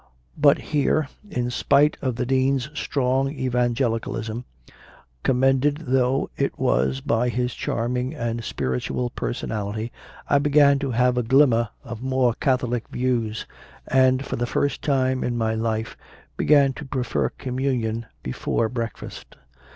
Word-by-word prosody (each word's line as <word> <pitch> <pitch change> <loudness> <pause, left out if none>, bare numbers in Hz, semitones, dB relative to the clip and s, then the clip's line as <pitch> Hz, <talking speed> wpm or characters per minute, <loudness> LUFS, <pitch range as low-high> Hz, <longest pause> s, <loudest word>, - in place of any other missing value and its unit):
But 145 -2 +5 0.2
here, 145 0 +2 0.2
in 125 -7 -2
spite 140 +4 +3
of 130 -3 -1
the 125 - -2
Dean 130 +1 +2
s 135 0 -3
strong 135 -2 0
Evangelical 125 -3 0
ism, 115 +2 -5 0.8
commended 135 - +2
though 130 +1 +1
it - - -1
was 65 +2 +1
by 120 +2 +1
his 125 0 -1
charming 125 +4 -2
and 115 -3 -3
spiritual 65 - -2
personality, 110 -1 -3 0.4
I 145 - +4
began 140 -1 +4
to 140 -1 -2
have 125 +1 +2
a - - +2
glim 135 +4 +5
mer 115 -1 +1
of 120 -3 -7
more 130 -2 +2
Catholic 125 -2 0
views, 120 -4 -1 0.4
and, 130 0 +3
for - - -3
the 120 +1 -1
first 140 +2 -1
time 130 -2 +1
in 120 -1 -1
my 110 -1 0
life, 110 0 -2 0.4
began 140 -2 +4
to 145 - -8
prefer 125 - -1
Communion 125 -4 -2 0.2
before 110 - -1
breakfast. 115 -2 -6
125 Hz, 140 wpm, -23 LUFS, 115-135 Hz, 0.8 s, But